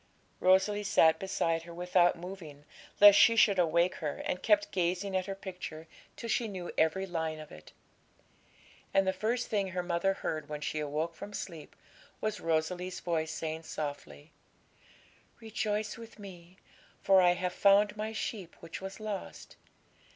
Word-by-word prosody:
Rosalie 190 +3 +3
sat 160 -5 +4
beside 165 -4 -1
her 170 +1 -11
without 175 0 +3
moving, 165 -5 -9 0.3
lest 205 0 +9
she 230 - +6
should 200 -4 +4
awake 170 +1 +3
her, 150 -4 -3
and 180 - -2
kept 205 -1 +3
gazing 185 +2 -1
at 185 0 0
her 195 - -4
picture 180 -5 -8 0.3
till 230 - -7
she 230 0 0
knew 185 -4 -6
every 160 +5 +1
line 160 -3 -3
of 155 - -11
it. 75 - -13 1.2
And 195 - +4
the 190 - +1
first 230 +5 -1
thing 200 -3 0
her 185 -1 -3
mother 175 +2 +1
heard 155 -5 -4
when 150 -1 -4
she 155 +1 -3
awoke 150 +3 -2
from 200 +5 -9
sleep 165 -6 -7 0.4
was 215 -1 -2
Rosalie's 175 +3 -1
voice 160 -2 -1
saying 160 0 -4
softly 150 -1 -7 1.1
'"Rejoice 215 -1 -2
with 230 -2 -12
Me, 185 -3 -12 0.5
for 190 -1 +6
I 175 -1 +5
have 180 0 -3
found 205 +2 +4
My 215 +1 -3
sheep 210 -5 -5
which 165 +1 -8
was 190 0 -7
lost. 215 -2 -6
185 Hz, 160 wpm, -31 LUFS, 165-200 Hz, 1.2 s, lest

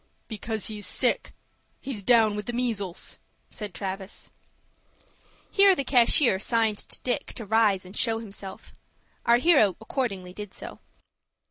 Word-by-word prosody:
"Because 220 -1 -3
he's 210 -2 -3
sick. - - +2 0.5
He's 255 -6 -5
down 220 -1 +4
with 210 -1 -5
the 240 - -3
measles," 220 -7 -3 0.3
said 210 -2 -6
Travis. 190 +2 -6 1.2
Here 395 -1 +6
the 275 - -1
cashier 245 -4 +4
signed 220 -1 +1
to - - -6
Dick 255 +3 -2
to 230 - -7
rise 205 -3 +2
and 185 +3 -12
show 225 -1 +1
himself. 200 -3 -9 0.5
Our 235 0 +6
hero 255 - +4
accordingly 200 -7 -4
did 205 -1 -8
so. - - -8
220 Hz, 135 wpm, -26 LUFS, 200-240 Hz, 1.2 s, Here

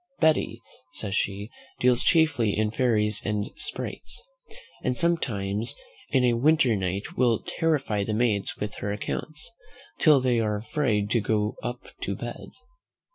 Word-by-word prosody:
"Betty," 160 -1 +2 0.3
says 100 - -3
she, 100 +2 -1 0.3
"deals 125 -1 +4
chiefly 155 - +3
in 110 0 +1
fairies 105 -4 +1
and 105 0 -2
sprites, - - -5 0.6
and 125 - 0
sometimes 110 -12 0 0.3
in 130 -3 +3
a 120 -1 +4
winter 135 -1 +4
night 95 +1 -3
will 120 -3 +4
terrify 145 -11 0
the 105 +1 -2
maids 110 -4 0
with 105 -1 -4
her 100 - -3
accounts, 150 - -4 0.5
till 150 -3 +6
they 125 -2 +2
are 105 -2 +1
afraid 105 -3 0
to 115 - +3
go 105 0 0
up 120 0 -4 0.2
to - - -2
bed." - - -7
115 Hz, 140 wpm, -26 LUFS, 105-130 Hz, 0.6 s, till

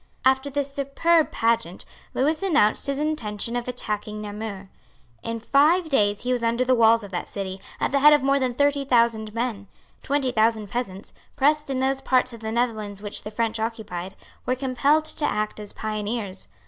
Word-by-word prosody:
After 265 +2 +3
this 280 0 -2
superb 300 +4 +2
pageant 225 -6 0 0.3
Lewis 305 +6 +1
announced 290 - +2
his 280 -1 -1
intention 235 -7 -2
of 245 0 -2
attacking 210 -3 -4
Namur. 205 -2 -6 0.5
In 230 0 -4
five 310 +8 +3
days 205 -7 +2
he 250 - -2
was 250 -1 +1
under 235 +2 +1
the 255 - +3
walls 230 -1 +5
of 200 - -9
that 175 - -4
city, 190 -1 -5 0.2
at - - 0
the 280 - +2
head 300 +2 +8
of 295 -2 +4
more 275 +1 +3
than 255 -2 -1
thirty 285 +1 +2
thousand 230 -4 +2
men. 230 -4 -3 0.3
Twenty 275 -2 0
thousand 220 -2 +1
peasants, 200 -5 -5 0.2
pressed 300 +1 +2
in 270 - -1
those 265 +1 0
parts 255 -1 +1
of 230 - -9
the 220 0 -4
Netherlands 215 -4 -2
which 205 - -6
the - - -7
French 225 +1 -1
occupied, 205 -5 -4 0.3
were 255 - +2
compelled 275 +4 +2
to 310 -1 -1
act 215 -5 -1
as 210 -1 -5
pioneers. 210 - -4
235 Hz, 185 wpm, -24 LUFS, 210-275 Hz, 0.5 s, head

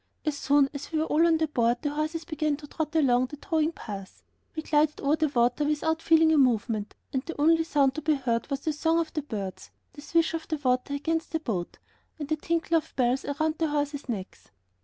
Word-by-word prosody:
As 305 -2 0
soon 285 0 +3
as 280 +3 -7
we 320 - 0
were 310 - +1
all 325 +2 +3
on 325 -1 +4
the 315 0 +1
boat 240 -4 +1
the 290 - 0
horses 310 +2 -3
began 310 -3 -1
to 300 - -11
trot 310 +2 -4
along 255 -5 +3
the 295 - -9
towing 315 +1 0
path; 200 - -9 0.3
we 315 - -3
glided 300 0 +2
over 285 +2 +2
the 315 0 +1
water 245 +1 +1
without 310 +2 0
feeling 325 -1 +5
a 305 - +4
movement, 225 -4 +1 0.2
and 265 - 0
the 335 - -6
only 325 +2 +4
sound 285 -5 +2
to 310 - -5
be 305 0 +2
heard 235 -3 -1
was 275 -1 -2
the 310 - -1
song 325 +2 +1
of 330 -1 -1
the 305 - -1
birds, 205 -9 -6 0.2
the 290 - -11
swish 330 +2 +1
of 325 -1 -4
the 310 - -1
water 255 0 0
against 325 +3 -2
the 320 - +1
boat, 200 - -4 0.4
and 295 -2 -6
the 310 - +2
tinkle 330 +1 0
of 315 - -5
bells 255 0 +1
around 310 +2 -1
the 325 - +2
horses' 290 -2 -2
necks. 195 -5 -6
295 Hz, 230 wpm, -27 LUFS, 265-320 Hz, 0.4 s, feeling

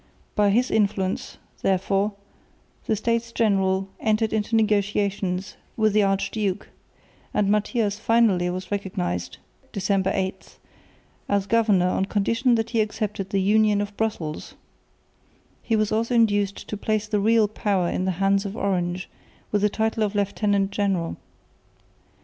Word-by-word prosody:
By 205 -1 +3
his 240 +5 +2
influence, 200 -3 0 0.2
therefore, 195 +2 +1 0.7
the 220 - +2
States 230 +2 -1
General 195 -4 +1
entered 220 0 +1
into 220 +1 0
negotiations 205 -3 0 0.2
with 215 -2 +2
the 215 - +4
Archduke; 195 0 -1 0.7
and 200 -1 +2
Matthias 210 0 0
finally 220 -6 +3
was 185 +1 -5
recognised 90 - -3 0.3
(December 195 -1 0
8) 190 0 -4 0.7
as 200 -1 +1
governor 205 -5 +3
on 190 - 0
condition 230 +5 +1
that 225 0 -1
he 230 -2 +2
accepted 210 -2 -3
the 195 -1 +1
Union 210 +1 +3
of 205 0 -4
Brussels, 190 -9 -3 1.1
He 225 - 0
was 215 -1 +1
also 230 +3 0
induced 205 -3 +1
to - - -3
place 215 0 -1
the 210 -1 0
real 220 +1 +4
power 200 -4 0
in 185 - -1
the 190 - 0
hands 195 0 +2
of 200 +1 -6
Orange 180 -2 -1 0.4
with 205 - +1
the 210 - +3
title 220 +1 -1
of 210 -1 0
Lieutenant 200 0 +1
General. 195 -5 -1
205 Hz, 140 wpm, -24 LUFS, 195-215 Hz, 1.1 s, the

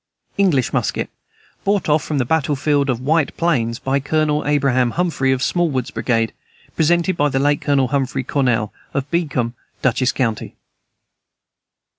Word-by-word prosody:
English 170 -11 +2
musket, - - -1 0.5
brought 200 -1 +1
off 150 -1 +2
from 150 - -2
the 130 - +1
battle 150 +1 +1
field 145 0 +1
of 120 -3 0
White 150 +3 0
Plains 120 -9 +1
by 135 +1 0
Colonel 150 +1 0
Abraham 135 -4 +2
Humphrey, 165 -7 +1
of 130 0 0
Smallwood's 150 -9 0
brigade. 115 -3 0 0.4
Presented 170 +3 +2
by 145 -3 +2
the 135 - -1
late 145 +1 +2
Colonel 135 -3 +2
Humphrey 135 -1 -1
Cornell, 125 -6 0 0.2
of 140 0 -2
Beekman, 140 -9 0 0.3
Dutchess 130 0 +2
county. 115 -5 -2
140 Hz, 145 wpm, -19 LUFS, 130-155 Hz, 0.5 s, English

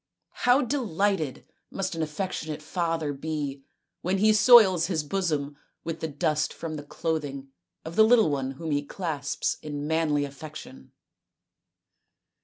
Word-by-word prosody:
" - - -59 0.2
How 250 +3 +5
delighted 200 - -1 0.2
must 195 -1 -3
an 165 - -3
affectionate 155 -1 -4
father 165 -2 -1
be 145 -1 -4 0.4
when 185 +3 0
he 215 +2 +4
soils 205 -6 +7
his 165 -5 -1
bosom 150 -4 -1 0.3
with 165 0 -4
the 160 - -2
dust 150 +1 0
from 165 -1 -5
the 150 - -5
clothing 145 -3 -3 0.4
of 160 +1 -7
the 220 - +7
little 220 -7 +5
one 135 -1 -2
whom 160 +3 -5
he 145 0 +1
clasps 145 -3 -3
in 145 -1 -5
manly 155 -2 +1
affection 140 - -10
160 Hz, 140 wpm, -27 LUFS, 145-185 Hz, 0.4 s, soils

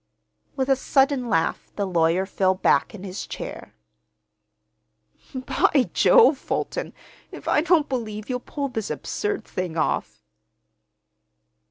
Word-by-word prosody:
With 265 -2 -1
a 270 - +4
sudden 270 -1 +1
laugh 165 -5 0
the 200 - -1
lawyer 175 0 +2
fell 190 -1 +1
back 195 - +2
in 190 - -10
his 190 0 -6
chair. - - -8 1.6
"By 260 +1 +1
Jove, 450 - +5
Fulton, - - -3 0.4
if - - -10
I - - +3
don't 325 -2 +3
believe 215 -5 -4
you'll 250 -1 -2
pull 280 +3 -4
this 220 -4 -4
absurd 415 -1 -3
thing 180 -3 -4
off!" 155 - -1
240 Hz, 125 wpm, -24 LUFS, 190-275 Hz, 1.6 s, Jove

